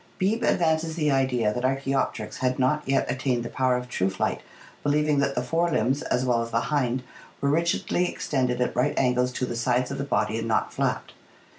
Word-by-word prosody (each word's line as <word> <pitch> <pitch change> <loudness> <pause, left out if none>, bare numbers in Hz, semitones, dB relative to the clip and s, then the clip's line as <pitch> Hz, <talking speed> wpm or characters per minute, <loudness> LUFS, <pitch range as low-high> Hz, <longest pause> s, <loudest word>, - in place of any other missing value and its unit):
Beebe 215 +5 0
advances 160 -1 +1
the 150 -3 +1
idea 125 -5 +1
that 125 - -3
ArcfuBopteryx 135 -4 -1
had 130 0 0
not 135 +4 +2
yet 135 - +2
attained 125 -1 -1
the - - -4
power 130 -1 +2
of 125 0 -5
true 95 -6 0
flight, 95 - -2 0.4
be 145 - +1
lieving 150 0 +2
that 140 0 0
the 125 - 0
fore 165 +7 +1
limbs 135 -1 +1
as 125 +1 0
well 120 -2 +2
as 115 - -4
the 115 0 +1
hind 130 -3 0 0.4
were 140 - +1
rigidly 170 +3 +1
ex - - -6
tended 125 -3 0
at 125 - 0
right 125 +4 +1
angles 125 -1 +2
to 125 - -1
the 120 - -4
sides 125 +2 0
of 135 - -4
the - - -1
body 115 -5 0
and 115 - -3
not 110 - 0
flapped. - - -2
130 Hz, 220 wpm, -26 LUFS, 125-145 Hz, 0.4 s, not